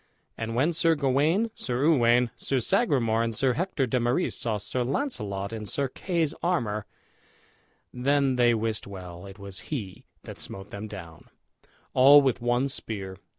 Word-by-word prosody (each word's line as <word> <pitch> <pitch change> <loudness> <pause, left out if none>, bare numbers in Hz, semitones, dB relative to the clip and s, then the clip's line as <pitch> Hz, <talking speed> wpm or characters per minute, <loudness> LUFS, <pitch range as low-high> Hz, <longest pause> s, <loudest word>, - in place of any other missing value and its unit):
And 115 0 -4
when 150 +8 +2
Sir 165 0 +3
Gawain, 150 - +2
Sir 125 +1 -1
Uwaine, 120 -6 +4
Sir 135 - -1
Sagramour, 125 - +2
and 115 -1 -1
Sir 130 +2 +2
Hector 165 -3 -1
de 125 +1 0
Marys 120 +9 0
saw 110 -3 -1
Sir 125 +5 -2
Launcelot 105 - -2
in 110 -2 -5
Sir 140 +6 0
Kay's 165 +1 -1
armor 115 - -1 1.1
then 135 +1 +2
they 120 -1 +4
wist 110 -2 -2
well 90 -2 -9
it 95 0 -11
was 100 -2 -8
he 105 -11 -5 0.2
that - - -10
smote 95 +1 -6
them 100 +2 -6
down, 85 -6 -10 0.7
all 140 +3 +8
with 130 -3 +1
one 120 +2 +1
spear. 100 -7 -4
120 Hz, 155 wpm, -27 LUFS, 105-140 Hz, 1.1 s, all